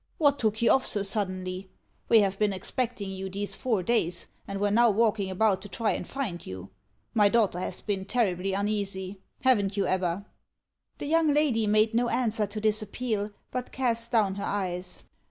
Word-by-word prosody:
What 285 -5 +3
took 220 0 0
you - - +5
off 265 - +4
so 205 - 0
suddenly? 185 -2 -3 0.4
We 225 -2 +7
have 195 -1 0
been 210 -2 +2
expecting 215 +1 -2
you 190 0 -5
these 200 +2 -1
four 220 -7 0
days, 175 -5 0 0.2
and 195 0 -4
were 205 0 +1
now 235 +2 +5
walking 215 -2 +2
about 190 0 +2
to 205 - -8
try 225 +1 0
and - - -3
find 235 -11 -4
you. 95 0 -8 0.4
My 210 -2 +5
daughter 210 -5 +2
has - - -4
been 195 -2 -2
terribly 195 -4 0
uneasy. 200 -1 -2 0.2
Haven't 205 -6 +3
you, 200 - +2
Ebba?" 185 +1 0 0.7
The - - -5
young 320 0 +3
lady 275 -7 +2
made 215 +2 +3
no 240 +1 +2
answer 220 -4 0
to 210 +2 -3
this 215 0 +1
appeal, 215 -1 -2 0.2
but 250 -1 -4
cast 235 -3 0
down 215 -5 +3
her 200 - -4
eyes. 180 -2 -3
205 Hz, 185 wpm, -28 LUFS, 190-230 Hz, 0.7 s, We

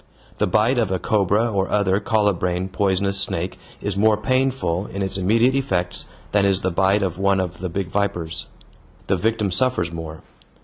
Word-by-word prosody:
The - - +1
bite 115 +4 +2
of 115 - +1
a 95 - 0
cobra 105 +4 +1
or 95 -2 0
other 100 -1 +2
colubrine 95 -4 0
poisonous 100 0 +1
snake 90 0 -2 0.2
is 100 -2 -2
more 105 +1 +3
painful 130 -6 0
in 100 +1 -4
its 95 0 -3
immediate 115 +7 +3
effects 95 -10 -1 0.2
than 105 -1 +3
is 100 -1 +2
the 95 - 0
bite 95 +3 +2
of 90 -2 -3
one 100 0 +2
of 90 -1 -3
the 90 0 -3
big 90 +1 -3
vipers. 90 -5 -2 0.6
The 95 - +1
victim 105 +1 0
suffers 95 -5 +1
more. 80 -1 -7
100 Hz, 175 wpm, -22 LUFS, 90-105 Hz, 0.6 s, more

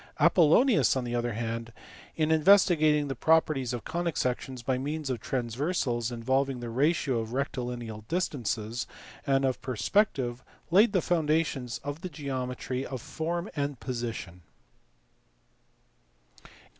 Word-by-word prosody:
Apollonius, 190 - +5
on 130 - -1
the 120 0 -4
other 120 -1 -1
hand, 115 +1 -4 0.4
in 155 -1 +1
investigating 155 -3 +5
the 135 - -2
properties 150 -3 +2
of 120 -3 -4
conic 170 -1 -2
sections 125 0 -2
by 130 +1 0
means 145 +1 -3
of 125 - -2
transversals 125 -1 -1
involving 130 +3 0
the 120 -1 -5
ratio 135 -1 +1
of 115 +1 -5
rectilineal 120 -5 -4
distances 120 - -2 0.4
and 135 0 +3
of 130 -2 -1
perspective, 130 - 0 0.3
laid 205 +4 +5
the 185 - +2
foundations 155 -7 0
of 145 +3 -5
the 185 - -5
geometry 130 -3 -4
of 130 -2 -5
form 165 - -3
and 140 -3 -2
position. 115 -8 -5
135 Hz, 125 wpm, -28 LUFS, 120-155 Hz, 0.4 s, Apollonius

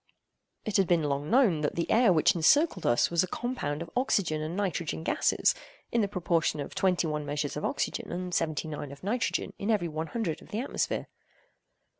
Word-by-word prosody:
It 215 -4 +1
had 195 -2 +3
been 170 -3 +3
long 145 0 -1
known 225 - +4
that 145 - -1
the 170 - -1
air 230 -3 +5
which 160 -3 +4
encircled 185 - +3
us 120 +6 +3
was 170 -1 +3
a - - -2
compound 180 - -3
of 165 - -13
oxygen 195 -11 +1
and 160 +4 -4
nitrogen 175 -5 -2
gases, - - +2 0.4
in 235 - +2
the 205 - +1
proportion 170 -5 0
of 140 - -5
twenty 180 -2 +1
one 150 -1 -2
measures 145 0 -3
of 150 - -4
oxygen, - - -2
and 180 0 -4
seventy 160 -1 -1
nine 145 -2 -6
of 140 - -12
nitrogen 230 +5 -1
in 200 - -3
every 205 -6 +2
one 160 0 -4
hundred 215 -8 -3
of - - -15
the 215 - -3
atmosphere. 265 - -2
170 Hz, 200 wpm, -29 LUFS, 155-205 Hz, 0.4 s, air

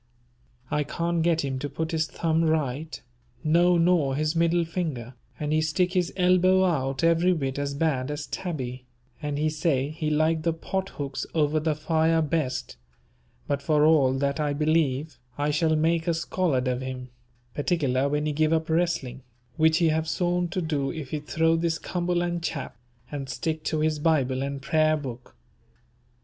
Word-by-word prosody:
I 150 - +1
can't 170 +3 -1
get 165 -1 +2
him 135 -1 -3
to 145 - -4
put 160 +4 -3
his 160 -1 0
thumb 165 0 0
right, 155 -1 -1 0.4
no 170 +3 +4
nor 165 -6 +3
his 155 +3 0
middle 170 +1 +2
finger, 155 -8 -4 0.3
and 150 0 -1
he 155 - +3
stick 180 +3 +1
his 180 -2 +1
elbow 185 +1 +4
out 135 -5 0
every 170 +2 +4
bit 135 -4 -2
as 140 0 -2
bad 140 -4 0
as 145 0 -4
Tabby, 130 -8 -5 0.3
and 145 -1 -2
he 155 +1 +1
say 150 -3 0
he 155 0 -3
like 155 +1 +2
the 165 +1 0
pot 190 +4 -3
hooks 140 -2 -5
over 155 0 +2
the 155 0 0
fire 160 +1 +2
best, 140 - -2 0.7
but 140 -1 -1
for 150 +1 +3
all 145 -5 +4
that 140 +2 -1
I 150 -1 0
believe 150 -1 0 0.2
I 145 +1 +1
shall 160 +1 +2
make 165 +2 +1
a 170 - +2
scholard 165 -6 0
of 125 0 -1
him, 130 -1 -6 0.4
particular 140 -4 0
when 150 +1 0
he 155 - 0
give 155 +2 +2
up 160 0 0
wrestling, 160 -7 0 0.3
which 160 0 +4
he 165 -1 +3
have 160 +1 0
sworn 175 0 0
to 180 +1 -3
do 145 -4 -1
if 155 -5 -7
he 155 - -1
throw 160 +2 +1
this 165 0 0
Cumberland 175 0 -1
chap, 155 -4 -4 0.4
and 140 -2 -5
stick 160 -2 -3
to 155 -1 0
his 155 -1 +1
Bible 135 -5 +1
and 140 0 -4
Prayer 155 0 +3
book. 125 - -8
155 Hz, 175 wpm, -26 LUFS, 140-165 Hz, 0.7 s, no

